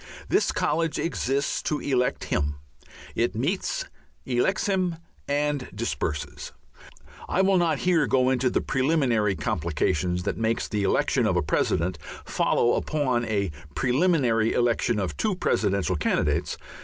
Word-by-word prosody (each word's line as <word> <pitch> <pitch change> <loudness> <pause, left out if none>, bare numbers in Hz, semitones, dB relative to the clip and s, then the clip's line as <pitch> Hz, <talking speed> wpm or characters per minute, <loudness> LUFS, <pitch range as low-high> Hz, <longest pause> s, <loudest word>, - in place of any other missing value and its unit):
This - - +2
college 160 +1 0
exists 140 -4 -1
to 150 - -1
elect 125 -2 0
him; 75 0 -1 0.6
it 115 -2 0
meets, 185 - -1 0.4
elects 130 +9 +1
him, 185 -4 0 0.3
and 145 -2 -1
disperses. 80 -8 -3 0.8
(I 190 - +2
will 195 0 +4
not 165 -4 +2
here 165 -3 +2
go 130 +3 +3
into 130 0 +2
the - - 0
preliminary 130 -8 +1
complications 85 +2 -1
that 100 - -2
makes 115 0 0
the 105 - -2
election 100 - +2
of - - +1
a - - +1
President 85 0 0 0.3
follow 120 - +2
upon 130 -6 0
a 100 -5 -1 0.2
preliminary 125 -5 +2
election 120 -1 +1
of 95 -3 -2
two 215 -3 0
Presidential 100 - +1
Candidates. 75 - 0
125 Hz, 130 wpm, -26 LUFS, 105-155 Hz, 0.8 s, will